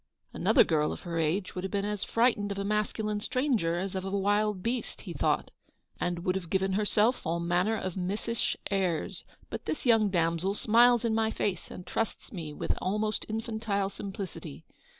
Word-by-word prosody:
"Another - - +5
girl 150 -2 +1
of - - -6
her 170 -2 -3
age 165 +5 0
would 180 - -4
have 190 - -2
been 200 0 -1
as 210 -2 -1
frightened 230 -3 +2
of 200 - -3
a 200 - -1
masculine 210 0 0
stranger 230 - +1
as 190 +1 -2
of 190 -1 -2
a 195 - -3
wild 205 0 +1
beast/' 235 +1 -2
he - - -7
thought, - - 0 0.2
" - - -39
and 175 -1 -1
would 185 - +2
have 185 -3 -4
given 190 +1 +1
her 210 +2 +1
self 220 +5 +3
all 170 +1 -1
manner 175 +5 +1
of 185 -3 -3
missish 205 +5 -1 0.2
airs; 185 -5 0 0.3
but - - -5
this 310 - -3
young 225 -4 +5
damsel 170 +2 +1
smiles 240 +2 +5
in 225 - +2
my 220 0 +2
face, 195 -4 -2
and 180 - -9
trusts 225 +4 -3
me 165 -5 -5
with - - -2
almost 210 +3 -1
infantile 220 -3 -1
simplicity. 190 - -7
200 Hz, 190 wpm, -29 LUFS, 180-215 Hz, 0.3 s, Another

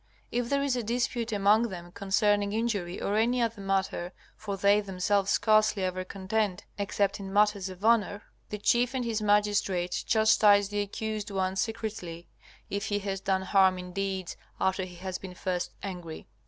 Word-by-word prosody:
If 240 0 -1
there 280 0 +1
is 275 -3 +1
a 245 - -1
dispute 235 0 -1
among 210 +3 +3
them 175 -2 -8
concerning 205 +1 +1
injury 205 -6 -1
or 205 - -1
any 240 +3 +2
other 230 -3 -1
matter 195 -2 -1 0.2
(for 200 -2 -5
they 200 +2 +4
themselves 195 0 0
scarcely 215 -2 +3
ever 185 0 -2
contend 195 +1 -2 0.2
except 200 0 0
in 195 -1 -7
matters 205 -1 +2
of 185 +2 -8
honor), 210 -3 +2 0.3
the 210 - -4
chief 240 +5 +2
and 250 -2 -1
his 225 -2 -1
magistrates 205 -4 +1
chastise 210 -2 +4
the 205 0 -1
accused 210 +1 -4
one 190 -1 -1
secretly, 195 -6 -4 0.4
if 200 +1 -3
he 205 - 0
has 195 -1 -3
done 190 -1 0
harm 190 -1 +4
in 180 0 -8
deeds 190 -2 -3 0.2
after 190 0 0
he 180 -1 -11
has 185 +1 -5
been 185 -2 -9
first 180 0 -2
angry. 175 -5 -6
200 Hz, 170 wpm, -28 LUFS, 190-215 Hz, 0.4 s, they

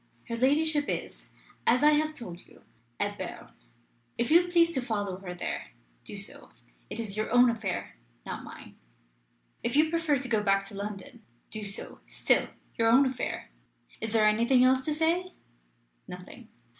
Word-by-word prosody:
Her 230 - -2
ladyship 290 +4 +2
is, - - -4 0.4
as 250 +4 +4
I 300 - +7
have 310 +1 +1
told 180 - -7
you, - - -19 0.4
at - - -1
Berne. - - -6 0.7
If 235 +5 0
you 345 +2 +6
please 340 -1 +4
to 265 - -1
follow 205 -6 -2
her 185 -2 -7
there, 175 - -5 0.3
do - - -5
so. - - -8 0.4
It - - -5
is 210 -4 -1
your 215 0 -1
own 245 +1 +6
affair, 200 - -4 0.3
not - - -5
mine. - - -12 0.8
If 235 - -1
you 310 +2 +4
prefer 330 -4 +2
to 255 0 -5
go 220 -3 +2
back 195 -1 +2
to - - -12
London, 200 -1 -7 0.3
do 215 -1 -4
so. 200 -1 -5
Still - - +2 0.3
your 225 - +4
own 260 +5 +6
affair. 255 - -3 0.5
Is 220 - -3
there 220 -1 +4
anything 235 +4 +4
else 260 +1 +4
to 305 - 0
say?" 345 +4 +1 0.7
Nothing. 185 +6 -10
240 Hz, 170 wpm, -29 LUFS, 210-300 Hz, 0.8 s, I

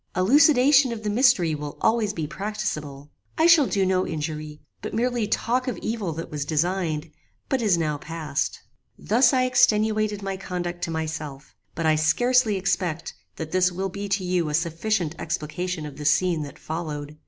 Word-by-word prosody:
Elucidation 275 - +5
of 225 -2 -6
the 210 - -1
mystery 210 - +3
will 150 -1 -6
always 220 -2 +2
be 165 -6 -4
practicable. 150 -6 -5 0.3
I 320 - +3
shall 335 -5 +6
do 195 -2 +1
no 185 0 +1
injury, 155 -1 -5 0.2
but - - -5
merely 240 -1 0
talk 250 +5 0
of 250 - -2
evil 220 -6 -3
that 165 +2 -7
was 150 -1 -3
designed, 160 0 -1 0.4
but 265 -2 +1
is 205 -6 +3
now 155 -3 -1
past. 160 -3 -3 0.4
"Thus 245 +4 +3
I 255 -2 +2
extenuated 215 -4 +2
my 195 -1 -3
conduct 175 -2 -5
to - - -7
myself, 155 -3 -5 0.2
but 165 - -2
I 155 -1 +3
scarcely 240 +8 +3
expect 180 -3 -2 0.2
that 160 -1 -6
this 185 0 +3
will 190 +2 -3
be 200 +2 -6
to 195 0 0
you 180 -3 0
a 150 - 0
sufficient 170 +1 -1
explication 160 +1 -3
of 150 - -9
the 150 - -7
scene 170 +2 +2
that 145 -1 -8
followed. 150 -2 -6
180 Hz, 175 wpm, -24 LUFS, 155-215 Hz, 0.4 s, shall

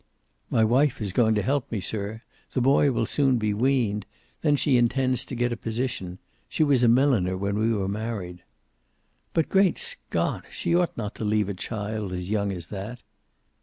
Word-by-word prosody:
"My 110 - +3
wife 130 +6 +3
is 100 -4 -3
going 110 0 +3
to 105 - +1
help 135 +3 -1
me, 110 - -1
sir. 105 +3 -3 0.3
The - - +1
boy 135 +2 +4
will 115 -2 0
soon 135 +1 +2
be 105 -2 0
weaned. 110 -4 +1 0.3
Then 150 -2 +3
she 140 -1 +2
intends 130 +1 +2
to 130 - -6
get 120 0 0
a - - -2
position. 115 -6 -3 0.3
She - - +1
was 140 -4 +3
a 120 - +5
milliner 115 -7 +3
when 100 +2 -1
we 110 +1 +2
were 100 -4 0
married." 100 -4 -4 0.9
"But 165 - +2
Great 195 -1 +3
Scott! 480 +1 -2
She - - -2
ought 175 -1 +1
not 105 -3 -4
to - - -1
leave 105 -1 +1
a - - -2
child 105 0 -4
as 90 +2 -4
young 100 -2 0
as 90 -4 -6
that." 105 +5 -6
115 Hz, 190 wpm, -26 LUFS, 100-130 Hz, 0.9 s, a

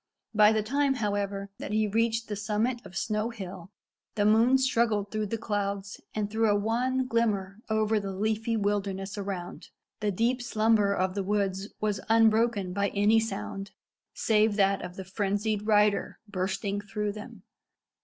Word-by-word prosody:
By 210 0 +6
the 215 -1 +1
time, 275 +4 +1
however, 200 -3 -2
that - - -5
he 215 0 +2
reached 225 +2 0
the 210 - -3
summit 220 +4 -1
of 180 - -9
Snow 215 +2 -1
Hill 190 -5 -8 0.5
the 205 - +2
moon 225 +5 +5
struggled 230 -6 +1
through 215 -1 -1
the 230 - -2
clouds, 200 -2 -3
and 210 -1 0
threw 220 +1 +1
a 205 - +4
wan 245 +5 0
glimmer 215 -5 0
over 220 0 +2
the 200 -1 -4
leafy 220 +3 -1
wilderness 200 -1 -1
around. 195 -3 -5 0.3
The 210 - 0
deep 235 +6 +1
slumber 215 -3 +2
of 185 -1 0
the 200 - -1
woods 195 -1 -1
was 210 -2 -1
unbroken 220 -3 +3
by 200 +1 +1
any 210 +2 +4
sound 195 -2 -4 0.4
save 215 -1 +2
that 195 -1 +2
of 180 - -7
the 190 - -7
frenzied 205 +2 -1
rider 210 -2 +3
bursting 200 +1 -2
through 210 0 -3
them. 210 +1 -10
210 Hz, 160 wpm, -28 LUFS, 200-225 Hz, 0.5 s, By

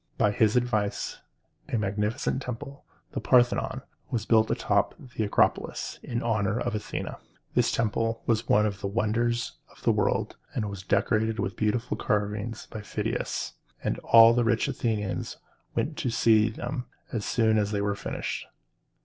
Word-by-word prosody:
By 105 - +3
his 110 0 +3
advice 110 -5 0 0.5
a - - +2
magnificent 105 +6 -1
temple, 135 +3 -7 0.3
the - - -3
Par´the 125 -1 +5
non, 130 - -4 0.3
was 115 -5 -2
built 110 -2 +4
on - - +2
top - - +1
of 125 - -14
the 110 - -1
Acropolis, 100 - +1
in 120 0 -3
honor 110 -1 +1
of 120 -1 -1
Athene. 105 - -3 0.4
This - - +3
temple, 115 0 0 0.2
one 105 +1 +4
of 100 -2 -2
the - - -1
wonders 120 +3 0
of - - -20
the - - +4
world, - - 0 0.2
was 100 -3 -3
decorated 110 +3 +1
with 95 - -2
beautiful 115 +4 0
carvings 105 +2 -1
by 110 - -5
Phidias, 105 - -3 0.3
and - - -1
all 115 0 +8
the 120 0 +2
rich 115 +4 +2
Athenians 110 -7 -2 0.4
went - - -1
to - - -1
see 110 -1 +4
them 125 +3 -4 0.3
as 110 -3 -1
soon 110 -1 +3
as 105 -1 +1
they 105 -1 -1
were 100 0 +1
finished. 100 - -4
110 Hz, 160 wpm, -27 LUFS, 105-120 Hz, 0.5 s, all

